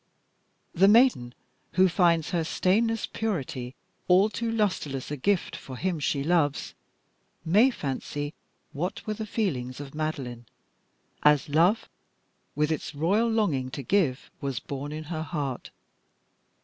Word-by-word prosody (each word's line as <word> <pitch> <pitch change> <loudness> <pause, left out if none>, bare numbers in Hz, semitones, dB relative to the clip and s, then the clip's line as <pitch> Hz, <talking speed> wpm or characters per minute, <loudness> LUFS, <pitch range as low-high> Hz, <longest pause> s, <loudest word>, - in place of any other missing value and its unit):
The 190 +3 +5
maiden 210 - +4 0.4
who 185 +2 +5
finds 170 -3 +2
her 170 -2 +1
stainless 220 +7 +1
purity 135 - -3 0.3
all 190 +4 +5
too 230 0 -2
lustreless 180 - -1
a - - -1
gift 185 +7 0
for 130 -2 -8
him 180 0 -1
she 140 -1 0
loves, 155 -3 +1 0.7
may 210 +11 +5
fancy 145 - -4 0.4
what 175 +6 -4
were 215 - -1
the 215 0 -5
feelings 130 - -2
of 140 -1 -8
Madeline, 135 -7 -4 0.7
as 150 -1 +4
love, 170 +9 +3 0.7
with 150 +1 +1
its 155 - -3
royal 200 +10 +2
longing 170 - +1
to 140 +1 -6
give, 145 -5 +1
was 135 -4 -3
born 140 +5 -6
in 155 +1 -5
her 155 0 -4
heart. 145 -6 -4
160 Hz, 135 wpm, -27 LUFS, 140-200 Hz, 0.7 s, The